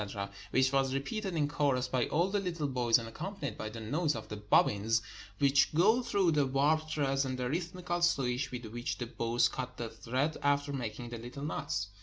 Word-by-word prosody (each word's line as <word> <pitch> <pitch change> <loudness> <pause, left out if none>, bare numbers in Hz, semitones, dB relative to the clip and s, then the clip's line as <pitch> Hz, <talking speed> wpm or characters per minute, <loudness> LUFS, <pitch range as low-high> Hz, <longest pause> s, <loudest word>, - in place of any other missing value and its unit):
— 100 0 -15
which 130 +1 +2
was 135 -1 +2
repeated 185 +8 -3
in 150 -2 +2
chorus 140 -4 +1
by 125 -1 0
all 170 +4 +2
the 205 - +1
little 170 -5 -2
boys, 125 -3 +3
and 115 -1 -6
accompanied 155 - -5
by 110 - -5
the 115 +1 -8
noise 150 +8 0
of 110 - -7
the 105 - -4
bobbins 105 +1 +3 0.4
which 140 -1 +4
go 215 +9 +5
through 200 -8 +2
the 145 -3 +2
warp 150 +4 +2
threads, 140 -3 +1
and 130 -1 -3
the 125 -1 -1
rhythmical 175 +3 -2
swish 135 -6 +1
with 125 -1 -5
which 120 +2 -4
the 120 - -3
boys 115 0 +1
cut 125 0 -5
the 115 -1 -4
thread 130 +7 -1
after 145 0 +1
making 120 -2 -4
the 120 -1 -6
little 125 +4 -8
knots. 100 -9 -2
135 Hz, 205 wpm, -32 LUFS, 120-155 Hz, 0.4 s, go